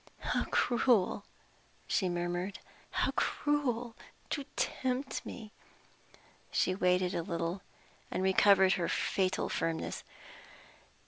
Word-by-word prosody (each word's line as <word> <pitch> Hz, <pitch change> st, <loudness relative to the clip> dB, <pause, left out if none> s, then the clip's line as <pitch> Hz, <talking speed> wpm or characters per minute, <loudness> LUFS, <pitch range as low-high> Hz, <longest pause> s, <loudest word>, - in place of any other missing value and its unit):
"How -, -, 0 dB
cruel!" 235 Hz, -5 st, +2 dB, 0.6 s
she 190 Hz, -4 st, +1 dB
murmured, 175 Hz, +2 st, -2 dB, 0.3 s
"how -, -, +1 dB
cruel 250 Hz, -6 st, 0 dB, 0.4 s
to 285 Hz, -3 st, -2 dB
tempt 260 Hz, +1 st, -1 dB
me!" 215 Hz, -3 st, -8 dB, 1.0 s
She 185 Hz, -, +2 dB
waited 180 Hz, -1 st, +2 dB
a -, -, 0 dB
little, 170 Hz, +2 st, -3 dB, 0.5 s
and 185 Hz, -, -2 dB
recovered 190 Hz, 0 st, +6 dB
her 170 Hz, -2 st, -1 dB
fatal 190 Hz, -1 st, 0 dB
firmness. 165 Hz, -1 st, -2 dB
190 Hz, 95 wpm, -32 LUFS, 180-240 Hz, 1.0 s, recovered